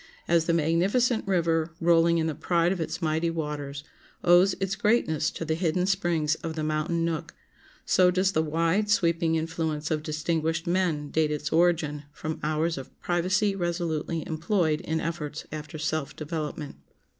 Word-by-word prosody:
As 170 Hz, -1 st, +3 dB
the 170 Hz, -, +1 dB
magnificent 195 Hz, +10 st, +2 dB
river, 165 Hz, -3 st, +1 dB
rolling 170 Hz, 0 st, +4 dB
in 160 Hz, -, +1 dB
the 160 Hz, -, -1 dB
pride 170 Hz, +2 st, +1 dB
of 185 Hz, -3 st, -2 dB
its 165 Hz, -, -4 dB
mighty 160 Hz, +1 st, +1 dB
waters, 150 Hz, -3 st, -4 dB, 0.4 s
owes 180 Hz, +2 st, +5 dB
its 195 Hz, 0 st, -2 dB
greatness 175 Hz, -10 st, +2 dB
to 165 Hz, -, -6 dB
the 160 Hz, -, 0 dB
hidden 175 Hz, +1 st, 0 dB
springs 175 Hz, -5 st, +1 dB
of 160 Hz, -1 st, -4 dB
the 155 Hz, -, -3 dB
mountain 155 Hz, +2 st, 0 dB
nook, 165 Hz, -2 st, -3 dB, 0.5 s
so 185 Hz, -1 st, +4 dB
does 185 Hz, +1 st, +2 dB
the 160 Hz, -, +2 dB
wide, 165 Hz, +6 st, +1 dB
sweeping 170 Hz, -4 st, +2 dB
influence 160 Hz, -1 st, -2 dB
of 155 Hz, -1 st, 0 dB
distinguished 160 Hz, +1 st, -1 dB
men 170 Hz, -5 st, 0 dB
date 155 Hz, -1 st, +2 dB
its 150 Hz, 0 st, -3 dB
origin 160 Hz, -3 st, +2 dB
from 155 Hz, 0 st, -5 dB
hours 155 Hz, 0 st, 0 dB
of 135 Hz, -, -12 dB
privacy 190 Hz, +4 st, +1 dB
resolutely 170 Hz, -3 st, -2 dB
employed 160 Hz, -1 st, 0 dB
in 160 Hz, 0 st, -2 dB
efforts 155 Hz, -2 st, -4 dB
after 155 Hz, 0 st, -6 dB
self 155 Hz, -1 st, -2 dB
development. 155 Hz, -2 st, -5 dB
165 Hz, 160 wpm, -27 LUFS, 155-175 Hz, 0.5 s, owes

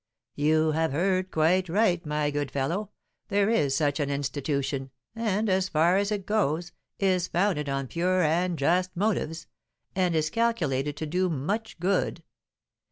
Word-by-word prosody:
"You 155 Hz, +2 st, +2 dB
have 160 Hz, -1 st, 0 dB
heard 185 Hz, +3 st, +1 dB
quite 175 Hz, +3 st, +2 dB
right, 180 Hz, -2 st, +2 dB
my 150 Hz, 0 st, 0 dB
good 145 Hz, -1 st, -2 dB
fellow, 165 Hz, +11 st, -2 dB, 0.4 s
there 205 Hz, +1 st, +2 dB
is 140 Hz, -11 st, +2 dB
such 145 Hz, 0 st, +1 dB
an 145 Hz, -1 st, 0 dB
institution, 140 Hz, -1 st, -2 dB, 0.3 s
and, 220 Hz, -1 st, 0 dB
as 185 Hz, -1 st, +1 dB
far 165 Hz, +4 st, +3 dB
as 200 Hz, +2 st, +1 dB
it 200 Hz, -3 st, -2 dB
goes, 175 Hz, -5 st, 0 dB, 0.3 s
is 185 Hz, -2 st, +1 dB
founded 175 Hz, -6 st, 0 dB
on 135 Hz, 0 st, -1 dB
pure 180 Hz, +6 st, +1 dB
and 170 Hz, +3 st, +1 dB
just 180 Hz, +5 st, +1 dB
motives, 170 Hz, -5 st, -1 dB, 0.5 s
and 180 Hz, -3 st, +1 dB
is 155 Hz, -1 st, +1 dB
calculated 155 Hz, -, 0 dB
to 155 Hz, -, -3 dB
do 180 Hz, +4 st, 0 dB
much 185 Hz, +9 st, -3 dB
good. 180 Hz, -1 st, 0 dB
170 Hz, 155 wpm, -27 LUFS, 150-190 Hz, 0.5 s, far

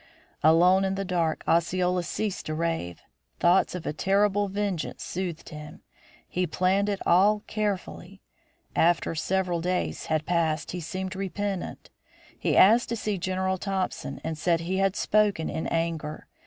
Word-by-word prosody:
Alone 180 Hz, +4 st, +5 dB
in 190 Hz, 0 st, 0 dB
the 195 Hz, 0 st, -3 dB
dark, 170 Hz, -4 st, -1 dB
Osceola 180 Hz, +2 st, +2 dB
ceased 205 Hz, +3 st, -3 dB
to 155 Hz, -, -2 dB
rave. 165 Hz, -, -3 dB, 0.4 s
Thoughts 180 Hz, +1 st, +3 dB
of 175 Hz, -2 st, -6 dB
a -, -, -2 dB
terrible 200 Hz, +4 st, +2 dB
vengeance 195 Hz, -4 st, -3 dB
soothed 175 Hz, -3 st, -4 dB
him. 150 Hz, -1 st, -10 dB, 0.4 s
He 180 Hz, 0 st, -1 dB
planned 190 Hz, +5 st, +1 dB
it 200 Hz, -1 st, -1 dB
all 205 Hz, +4 st, +4 dB
carefully. 195 Hz, -2 st, -4 dB, 0.6 s
After 170 Hz, 0 st, +2 dB
several 180 Hz, +1 st, 0 dB
days 180 Hz, +1 st, -2 dB
had 155 Hz, -1 st, 0 dB
passed 160 Hz, -2 st, 0 dB
he 180 Hz, -, -4 dB
seemed 185 Hz, +3 st, -5 dB
repentant. 195 Hz, 0 st, -4 dB, 0.4 s
He -, -, 0 dB
asked 225 Hz, +5 st, +6 dB
to 235 Hz, -, -1 dB
see 210 Hz, -3 st, -2 dB
General 190 Hz, +1 st, -1 dB
Thompson 190 Hz, -8 st, -3 dB
and 160 Hz, -1 st, -4 dB
said 170 Hz, 0 st, +2 dB
he 180 Hz, +3 st, -2 dB
had 195 Hz, 0 st, +2 dB
spoken 210 Hz, -7 st, +1 dB
in 160 Hz, -, -3 dB
anger. 165 Hz, -2 st, -2 dB
180 Hz, 150 wpm, -27 LUFS, 165-195 Hz, 0.6 s, asked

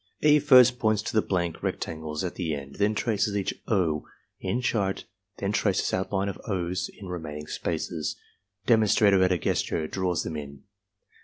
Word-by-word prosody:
E. 150 Hz, 0 st, +6 dB
first 125 Hz, -4 st, +6 dB
points 110 Hz, -1 st, +2 dB
to -, -, -4 dB
the 110 Hz, -, +4 dB
blank 85 Hz, -5 st, -2 dB
rectangles 80 Hz, 0 st, -3 dB
at 90 Hz, -, -3 dB
the 80 Hz, -5 st, -2 dB
end, 70 Hz, -1 st, -9 dB
then 105 Hz, +1 st, +2 dB
traces 105 Hz, -2 st, 0 dB
each 100 Hz, -, -1 dB
"O" 85 Hz, -8 st, +1 dB, 0.4 s
in 120 Hz, -, -1 dB
chart, 105 Hz, -6 st, -1 dB, 0.3 s
then 100 Hz, 0 st, -1 dB
traces 100 Hz, -2 st, +1 dB
outline 95 Hz, +1 st, 0 dB
of 100 Hz, -, -5 dB
"O's" 90 Hz, -2 st, -2 dB
in 100 Hz, -, -9 dB
remaining 80 Hz, -4 st, -6 dB
spaces. 80 Hz, -1 st, -3 dB, 0.5 s
Demonstrator, 105 Hz, -4 st, +4 dB
at 95 Hz, 0 st, +4 dB
a 90 Hz, -, +3 dB
gesture, 80 Hz, -1 st, -1 dB
draws 90 Hz, -1 st, -1 dB
them 80 Hz, -, -5 dB
in. 70 Hz, -2 st, -8 dB
95 Hz, 165 wpm, -27 LUFS, 80-105 Hz, 0.5 s, E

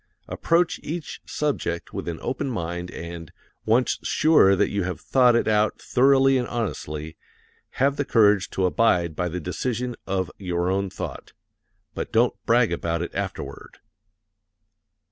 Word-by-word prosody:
Approach 170 Hz, +1 st, +1 dB
each 160 Hz, 0 st, -6 dB
subject 135 Hz, -, -2 dB
with -, -, -5 dB
an 85 Hz, -1 st, -3 dB
open 135 Hz, +1 st, -2 dB
mind 90 Hz, -5 st, -4 dB
and 85 Hz, -1 st, -8 dB, 0.4 s
once 120 Hz, +3 st, +2 dB
sure 150 Hz, -11 st, +4 dB
that -, -, +1 dB
you 100 Hz, -, -1 dB
have 90 Hz, 0 st, -3 dB
thought 125 Hz, -3 st, +4 dB
it 120 Hz, -, +1 dB
out 105 Hz, 0 st, +2 dB
thoroughly 135 Hz, +1 st, +4 dB
and 125 Hz, -, -2 dB
honestly 80 Hz, -9 st, -4 dB, 0.6 s
have 140 Hz, +2 st, +1 dB
the 145 Hz, -, +1 dB
courage 105 Hz, -7 st, +3 dB
to 95 Hz, -, -1 dB
abide 90 Hz, -5 st, +2 dB
by 90 Hz, +2 st, -1 dB
the 90 Hz, +2 st, -4 dB
decision 120 Hz, +8 st, -3 dB
of 95 Hz, -1 st, -1 dB
your 90 Hz, -1 st, -1 dB
own 100 Hz, 0 st, 0 dB
thought. -, -, -7 dB, 0.6 s
But -, -, -5 dB
don't -, -, +3 dB
brag -, -, +4 dB
about 85 Hz, 0 st, -2 dB
it 85 Hz, -, -6 dB
afterward. -, -, -6 dB
100 Hz, 145 wpm, -24 LUFS, 90-125 Hz, 0.6 s, sure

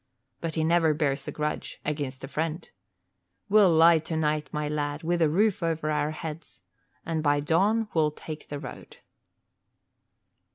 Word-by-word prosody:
But 165 Hz, -1 st, -4 dB
he 160 Hz, -, +1 dB
never 165 Hz, -1 st, +3 dB
bears 145 Hz, -2 st, -1 dB
a -, -, -2 dB
grudge 150 Hz, 0 st, -4 dB
against 140 Hz, -3 st, -3 dB
a -, -, -4 dB
friend. 160 Hz, +3 st, -3 dB, 0.8 s
We'll 200 Hz, -3 st, +6 dB
lie 165 Hz, 0 st, +6 dB
tonight, 155 Hz, -1 st, -1 dB
my 150 Hz, 0 st, -2 dB
lad, 145 Hz, +1 st, -2 dB
with 170 Hz, +1 st, 0 dB
a 160 Hz, -, +4 dB
roof 200 Hz, +4 st, +2 dB
over 160 Hz, -2 st, -1 dB
our 150 Hz, 0 st, 0 dB
heads, 155 Hz, 0 st, -7 dB, 0.4 s
and 160 Hz, -1 st, -1 dB
by 145 Hz, -1 st, +2 dB
dawn 195 Hz, +9 st, +2 dB
we'll 155 Hz, -2 st, +3 dB
take 150 Hz, 0 st, -9 dB
the 145 Hz, -, -4 dB
road." 140 Hz, -3 st, -10 dB
155 Hz, 155 wpm, -27 LUFS, 150-165 Hz, 0.8 s, We'll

